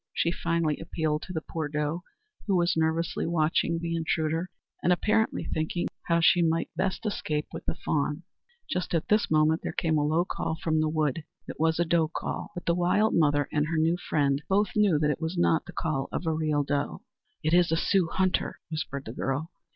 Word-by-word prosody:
she 170 Hz, -, +2 dB
finally 165 Hz, -3 st, 0 dB
appealed 155 Hz, -2 st, -1 dB
to -, -, -8 dB
the 160 Hz, -3 st, -3 dB
poor 160 Hz, -2 st, -3 dB
doe, 150 Hz, +3 st, -2 dB, 0.5 s
who 195 Hz, -, +2 dB
was 175 Hz, 0 st, +2 dB
nervously 160 Hz, +1 st, 0 dB
watching 165 Hz, 0 st, +1 dB
the 165 Hz, 0 st, -2 dB
intruder, 160 Hz, +1 st, -1 dB, 0.3 s
and 180 Hz, -, +2 dB
apparently 215 Hz, +5 st, +2 dB
thinking 160 Hz, +2 st, -1 dB, 0.2 s
how 170 Hz, -1 st, +3 dB
she 175 Hz, +1 st, +5 dB
might 165 Hz, 0 st, +1 dB
best 190 Hz, +3 st, -1 dB
escape 150 Hz, -7 st, -1 dB
with -, -, -6 dB
the -, -, -1 dB
fawn. 150 Hz, +2 st, -1 dB, 0.4 s
Just 180 Hz, -1 st, -2 dB
at 165 Hz, -, -1 dB
this 210 Hz, 0 st, +3 dB
moment 155 Hz, +1 st, +3 dB
there -, -, -3 dB
came 160 Hz, -2 st, +1 dB
a -, -, +1 dB
low 160 Hz, +4 st, +2 dB
call 160 Hz, -, -3 dB
from 160 Hz, -1 st, +2 dB
the 155 Hz, -, +1 dB
wood. 155 Hz, -1 st, 0 dB, 0.2 s
It -, -, -8 dB
was 160 Hz, 0 st, +2 dB
a 170 Hz, -, +3 dB
doe 165 Hz, -1 st, +2 dB
call; 165 Hz, -, -4 dB
but 175 Hz, -, -6 dB
the 170 Hz, -, +3 dB
wild 180 Hz, +5 st, +2 dB
mother 145 Hz, -3 st, +3 dB
and 150 Hz, 0 st, +1 dB
her 165 Hz, 0 st, -1 dB
new 160 Hz, +2 st, +3 dB
friend 145 Hz, -5 st, 0 dB
both 200 Hz, +1 st, +3 dB
knew 205 Hz, -7 st, +4 dB
that 150 Hz, 0 st, +2 dB
it 155 Hz, -, -4 dB
was 165 Hz, +3 st, -2 dB
not 165 Hz, -2 st, +2 dB
the -, -, -7 dB
call 145 Hz, -4 st, -2 dB
of -, -, -3 dB
a 160 Hz, -, +1 dB
real 155 Hz, -2 st, +1 dB
doe. 140 Hz, -, -2 dB, 0.4 s
"It 155 Hz, +2 st, +1 dB
is 175 Hz, -2 st, +4 dB
a 165 Hz, -, +2 dB
Sioux 185 Hz, -1 st, +2 dB
hunter!" 185 Hz, -1 st, 0 dB
whispered 140 Hz, -3 st, -4 dB
the 110 Hz, -, -6 dB
girl. 145 Hz, +7 st, -2 dB
160 Hz, 210 wpm, -28 LUFS, 155-175 Hz, 0.5 s, she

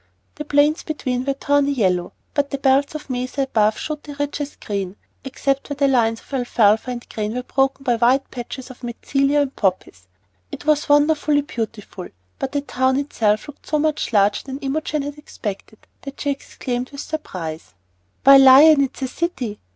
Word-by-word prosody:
The 300 Hz, -, -7 dB
plains 295 Hz, +2 st, +3 dB
between 255 Hz, -5 st, -3 dB
were 275 Hz, -, +1 dB
of 275 Hz, -, -25 dB
tawny 285 Hz, 0 st, +2 dB
yellow, 185 Hz, -8 st, 0 dB, 0.2 s
but 285 Hz, -1 st, 0 dB
the 275 Hz, -, -3 dB
belts 275 Hz, +2 st, +2 dB
of 305 Hz, -, -7 dB
mesa 255 Hz, +1 st, -2 dB
above 215 Hz, -5 st, +1 dB
showed 305 Hz, -1 st, -4 dB
the 290 Hz, -1 st, -9 dB
richest 290 Hz, 0 st, -4 dB
green, 195 Hz, -2 st, -3 dB, 0.3 s
except 275 Hz, +1 st, -2 dB
where 285 Hz, -, -3 dB
the 280 Hz, 0 st, +2 dB
lines 230 Hz, -4 st, +2 dB
of -, -, -18 dB
alfalfa 230 Hz, -3 st, +2 dB
and 245 Hz, -1 st, -6 dB
grain 215 Hz, +1 st, -4 dB
were 250 Hz, -, -3 dB
broken 270 Hz, +1 st, 0 dB
by 245 Hz, -3 st, +1 dB
white 255 Hz, +4 st, +2 dB
patches 255 Hz, +1 st, -7 dB
of 255 Hz, -, -15 dB
mentzelia 275 Hz, +4 st, 0 dB
and 275 Hz, -1 st, -3 dB
poppies. 180 Hz, -, -2 dB, 0.4 s
It -, -, -8 dB
was 300 Hz, -1 st, +2 dB
wonderfully 290 Hz, 0 st, +3 dB
beautiful, 225 Hz, -8 st, -6 dB, 0.3 s
but 265 Hz, -, -3 dB
the 285 Hz, -, -1 dB
town 260 Hz, -2 st, 0 dB
itself 225 Hz, -6 st, 0 dB
looked 290 Hz, -, -13 dB
so 305 Hz, -, +1 dB
much 305 Hz, -3 st, 0 dB
larger 205 Hz, -1 st, +2 dB
than 270 Hz, -1 st, -5 dB
Imogen 300 Hz, +1 st, -2 dB
had 290 Hz, +1 st, -6 dB
expected 215 Hz, -6 st, -7 dB, 0.2 s
that 275 Hz, 0 st, -9 dB
she 285 Hz, -, 0 dB
exclaimed 255 Hz, -2 st, -4 dB
with 280 Hz, 0 st, -7 dB
surprise: 160 Hz, -, -6 dB, 0.5 s
"Why, 275 Hz, 0 st, +9 dB
Lion, 275 Hz, +3 st, +8 dB
it's 270 Hz, 0 st, -4 dB
a -, -, 0 dB
city! 255 Hz, -7 st, -3 dB
270 Hz, 180 wpm, -21 LUFS, 230-285 Hz, 0.5 s, Why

